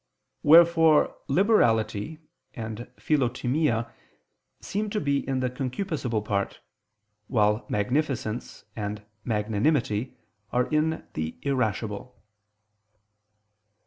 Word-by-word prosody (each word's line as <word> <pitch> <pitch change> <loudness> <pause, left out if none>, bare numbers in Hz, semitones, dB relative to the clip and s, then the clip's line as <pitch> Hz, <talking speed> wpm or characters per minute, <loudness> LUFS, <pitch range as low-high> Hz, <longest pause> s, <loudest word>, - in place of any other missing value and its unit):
_ - - -53 0.4
Wherefore 165 0 +6
liberality 140 - +2 0.4
and 110 0 -6
philotimia 125 -3 0 0.7
seem 210 +2 -3
to 210 - -1
be 140 -1 +1
in 130 -1 0
the 130 - 0
concupiscible 130 - -2
part, 100 -1 -1 0.7
while 105 -2 +2
magnificence 120 +1 -2
and 105 -1 -4 0.2
magnanimity 110 +2 0 0.3
are 125 0 +2
in 155 +1 +1
the 80 +1 -4
irascible. 120 -3 -2
125 Hz, 85 wpm, -26 LUFS, 110-150 Hz, 0.7 s, Wherefore